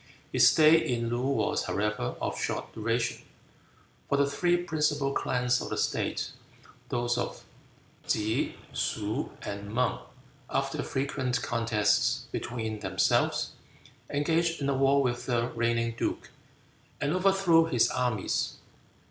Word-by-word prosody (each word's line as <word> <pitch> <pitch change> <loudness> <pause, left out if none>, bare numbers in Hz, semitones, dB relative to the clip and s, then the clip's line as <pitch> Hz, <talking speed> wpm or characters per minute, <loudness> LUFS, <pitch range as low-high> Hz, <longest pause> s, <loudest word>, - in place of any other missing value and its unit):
His - - +6
stay 155 +1 +6
in 115 -2 -1
Loo 120 +1 -1
was, 140 - 0
however, 105 -10 -1
of - - -3
short - - -3
duration, 115 +2 -1 0.9
for 140 - +2
the 140 0 +3
three 175 +5 +2
principal 150 -5 0
clans 125 -1 +1
of - - -5
the - - -3
state, - - -1 0.6
those 120 0 0
of - - -4 0.6
Ke, 110 +1 0 0.2
Shuh, 110 +6 -2
and 100 0 -6
Mang, 125 +3 +1 0.5
after 135 +2 -1
frequent 130 -3 -1
contests 115 -3 +1
between 110 -3 -4
themselves, - - +1 0.6
engaged 165 +3 +1
in 140 -1 -1
a 140 - +1
war 135 +1 +4
with 120 -1 -2
the 120 -1 +1
reigning 115 0 0
duke, - - -3 0.7
and 145 +2 0
overthrew 185 -3 +4
his 125 -8 +3
armies. 125 -6 -1
125 Hz, 125 wpm, -29 LUFS, 115-145 Hz, 0.9 s, His